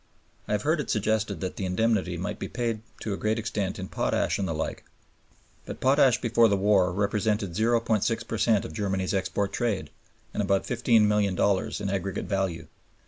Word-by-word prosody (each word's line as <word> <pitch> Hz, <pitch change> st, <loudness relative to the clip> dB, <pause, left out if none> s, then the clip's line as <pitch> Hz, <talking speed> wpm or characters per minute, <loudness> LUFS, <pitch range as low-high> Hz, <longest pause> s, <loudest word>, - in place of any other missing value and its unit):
I -, -, -1 dB
have 105 Hz, -, 0 dB
heard 155 Hz, +2 st, +2 dB
it 135 Hz, -, -7 dB
suggested 110 Hz, -1 st, 0 dB
that 95 Hz, -, -4 dB
the 95 Hz, -, -2 dB
indemnity 95 Hz, -2 st, 0 dB
might 100 Hz, +4 st, -4 dB
be -, -, -4 dB
paid 115 Hz, -3 st, -2 dB, 0.2 s
to 105 Hz, -, -2 dB
a -, -, -3 dB
great 110 Hz, +1 st, 0 dB
extent 100 Hz, -3 st, -2 dB
in 95 Hz, -, -5 dB
potash -, -, 0 dB
and 95 Hz, -, -1 dB
the 80 Hz, -, -2 dB
like. 80 Hz, -, -4 dB, 0.8 s
But -, -, -6 dB
potash 135 Hz, -2 st, +4 dB
before 115 Hz, -1 st, +4 dB
the 100 Hz, -2 st, +2 dB
war 95 Hz, -2 st, +3 dB
represented 105 Hz, +1 st, 0 dB
0.6 115 Hz, +1 st, +1 dB
per 115 Hz, -, -3 dB
cent 110 Hz, -4 st, +3 dB
of -, -, -7 dB
Germany's 95 Hz, 0 st, -1 dB
export 100 Hz, +1 st, -1 dB
trade, 115 Hz, -6 st, -1 dB, 0.4 s
and -, -, -1 dB
about 100 Hz, -1 st, +1 dB
$15,000,000 105 Hz, -5 st, +2 dB
in 100 Hz, -, -2 dB
aggregate 95 Hz, 0 st, -2 dB
value. 95 Hz, -4 st, -2 dB
105 Hz, 180 wpm, -27 LUFS, 95-115 Hz, 0.8 s, potash